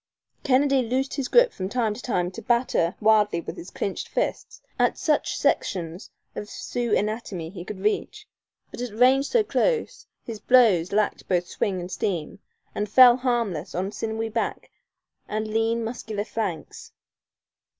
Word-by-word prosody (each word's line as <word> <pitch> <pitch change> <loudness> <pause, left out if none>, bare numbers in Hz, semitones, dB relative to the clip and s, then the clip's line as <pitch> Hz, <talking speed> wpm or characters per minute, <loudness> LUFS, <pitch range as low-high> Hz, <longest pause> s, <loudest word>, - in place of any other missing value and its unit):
Kennedy 275 0 +3
loosed 255 +3 -1
his 275 -3 -2
grip - - +4
from 185 0 -4
time 225 -2 0
to 225 - -9
time 180 -7 -1
to 230 - -8
batter 235 -7 +1
wildly 210 -4 +3
with - - -7
his 175 - -9
clinched 195 - -4
fists - - -3 0.2
at - - +2
such 305 -4 0
sections 170 -1 -1 0.3
of 210 - -6
Sioux 240 -3 -1
anatomy 205 -6 -3
as - - -15
he 175 -3 -7
could 190 +1 -8
reach; 425 - -2 0.4
but, - - -7
at 240 -4 -5
range 265 +3 +4
so 470 -2 +3
close, 465 +2 -1 0.2
his 225 -3 -7
blows 215 -10 +4
lacked 210 +1 0
both 180 -2 +1
swing 190 +1 -2
and 175 +1 -7
steam, 180 0 -3 0.3
and 210 0 -3
fell 245 +2 +8
harmless 230 - -2
on 190 +3 -2
sinewy 225 +1 -3
back 225 +1 -3 0.6
and 215 +1 -3
lean, 225 +1 0
muscular 220 -2 -4
flanks. 190 -9 -5
220 Hz, 160 wpm, -25 LUFS, 190-245 Hz, 0.6 s, fell